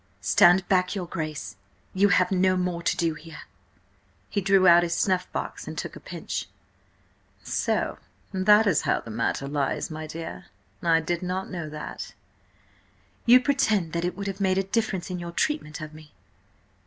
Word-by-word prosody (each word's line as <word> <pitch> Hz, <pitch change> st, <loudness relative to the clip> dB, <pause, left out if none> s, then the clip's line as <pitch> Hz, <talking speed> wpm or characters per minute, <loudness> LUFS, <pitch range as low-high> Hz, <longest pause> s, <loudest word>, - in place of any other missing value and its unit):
"Stand 180 Hz, +2 st, +5 dB
back, 185 Hz, 0 st, +2 dB
your 185 Hz, -3 st, -3 dB
Grace! 155 Hz, -11 st, -5 dB, 0.4 s
You 200 Hz, +2 st, +4 dB
have 180 Hz, 0 st, +3 dB
no 185 Hz, 0 st, +3 dB
more 180 Hz, -2 st, -1 dB
to 170 Hz, -, 0 dB
do 165 Hz, -2 st, +1 dB
here!" 155 Hz, 0 st, -11 dB, 0.9 s
He 200 Hz, -, 0 dB
drew 195 Hz, -1 st, +4 dB
out 170 Hz, 0 st, +8 dB
his 170 Hz, -1 st, -1 dB
snuff 185 Hz, -2 st, 0 dB
box -, -, -5 dB
and -, -, -6 dB
took -, -, -5 dB
a -, -, -9 dB
pinch. -, -, -5 dB, 1.0 s
"So -, -, -1 dB, 0.3 s
that 210 Hz, +3 st, +5 dB
is 190 Hz, -7 st, +3 dB
how -, -, 0 dB
the 115 Hz, -, -9 dB
matter 115 Hz, +4 st, -1 dB
lies, 140 Hz, +2 st, -1 dB
my 155 Hz, 0 st, -6 dB
dear. 165 Hz, +1 st, -7 dB, 0.3 s
I 165 Hz, -1 st, +3 dB
did 170 Hz, +2 st, -2 dB
not 185 Hz, +1 st, -3 dB
know 170 Hz, -4 st, -5 dB
that." 150 Hz, 0 st, -7 dB, 1.1 s
"You 250 Hz, +2 st, +8 dB
pretend 220 Hz, -, +1 dB
that 170 Hz, 0 st, -1 dB
it 180 Hz, +1 st, -2 dB
would 200 Hz, -, -4 dB
have 195 Hz, 0 st, -4 dB
made 190 Hz, -1 st, +2 dB
a 195 Hz, -, +2 dB
difference 195 Hz, -2 st, -2 dB
in 180 Hz, -, -3 dB
your 170 Hz, 0 st, -6 dB
treatment 170 Hz, -, -1 dB
of 155 Hz, 0 st, -7 dB
me?" 155 Hz, -1 st, -14 dB
180 Hz, 175 wpm, -26 LUFS, 160-195 Hz, 1.1 s, out